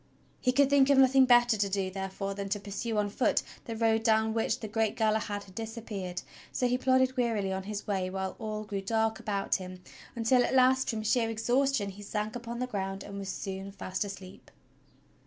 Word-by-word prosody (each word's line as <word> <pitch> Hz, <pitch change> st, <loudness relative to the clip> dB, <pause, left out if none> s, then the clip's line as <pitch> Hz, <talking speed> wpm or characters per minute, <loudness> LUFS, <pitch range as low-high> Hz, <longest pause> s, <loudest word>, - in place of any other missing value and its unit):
He 250 Hz, -, +2 dB
could 280 Hz, +2 st, +4 dB
think 280 Hz, -1 st, +4 dB
of 280 Hz, -, +5 dB
nothing 265 Hz, 0 st, +6 dB
better 240 Hz, -2 st, +5 dB
to 200 Hz, -1 st, +1 dB
do, 190 Hz, -1 st, -1 dB
therefore, 195 Hz, +1 st, -4 dB
than 200 Hz, 0 st, -5 dB
to 205 Hz, +1 st, -1 dB
pursue 210 Hz, +3 st, -4 dB
on 205 Hz, -1 st, 0 dB
foot 245 Hz, -, +1 dB, 0.2 s
the 230 Hz, -, -5 dB
road 225 Hz, 0 st, +2 dB
down 220 Hz, -1 st, +2 dB
which 225 Hz, +1 st, 0 dB
the 220 Hz, -, -5 dB
great 220 Hz, 0 st, 0 dB
Galahad 215 Hz, -2 st, 0 dB
had 190 Hz, -, -16 dB
disappeared; 215 Hz, -4 st, -5 dB, 0.3 s
so 250 Hz, -, +1 dB
he 245 Hz, -, +1 dB
plodded 260 Hz, 0 st, +2 dB
wearily 225 Hz, -6 st, 0 dB
on 190 Hz, -, -2 dB
his 210 Hz, -1 st, -4 dB
way 190 Hz, -3 st, -1 dB
while 190 Hz, 0 st, -3 dB
all 215 Hz, -1 st, -4 dB
grew 205 Hz, -2 st, -4 dB
dark 220 Hz, +2 st, 0 dB
about 200 Hz, -2 st, -1 dB
him, 185 Hz, -1 st, -8 dB, 0.4 s
until 245 Hz, +2 st, +3 dB
at -, -, 0 dB
last, 260 Hz, 0 st, +4 dB
from 220 Hz, -2 st, -2 dB
sheer 225 Hz, +1 st, +2 dB
exhaustion 240 Hz, -1 st, +1 dB
he 200 Hz, +2 st, -12 dB
sank 210 Hz, +1 st, -3 dB
upon 235 Hz, 0 st, -5 dB
the 250 Hz, -, -1 dB
ground 195 Hz, -4 st, -4 dB
and 200 Hz, 0 st, -7 dB
was 195 Hz, -1 st, -5 dB
soon 195 Hz, +1 st, -5 dB
fast 190 Hz, -1 st, -3 dB
asleep. 195 Hz, -2 st, -9 dB
215 Hz, 205 wpm, -30 LUFS, 195-240 Hz, 0.4 s, nothing